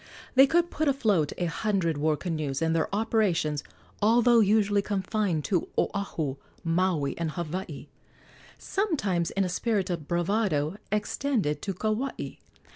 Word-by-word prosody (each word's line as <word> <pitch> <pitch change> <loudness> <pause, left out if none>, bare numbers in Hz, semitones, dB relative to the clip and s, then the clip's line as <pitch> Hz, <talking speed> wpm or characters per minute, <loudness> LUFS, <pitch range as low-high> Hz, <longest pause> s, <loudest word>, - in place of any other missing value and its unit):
They 270 +1 +7
could 345 +3 +2
put 310 0 -1
afloat 210 - +2
a 175 - -1
hundred 175 -2 0
war 155 0 +2
canoes, 155 -6 -2
and 165 0 +1
their 160 - +1
operations, 200 -9 +1 0.4
although 235 +2 +5
usually 205 -1 +3
confined 195 -5 -1
to 180 -5 0
Oahu, 160 -9 -1 0.3
Maui, 165 -4 +1
and 165 -1 -1
Hawaii, 175 +3 -5 0.7
sometimes 210 - -1
in 195 - 0
a - - 0
spirit 195 0 0
of 165 -4 -4
bravado 175 -2 0
extended 210 - 0
to 195 -2 -3
Kauai. 220 +7 -2
190 Hz, 130 wpm, -27 LUFS, 165-215 Hz, 0.7 s, They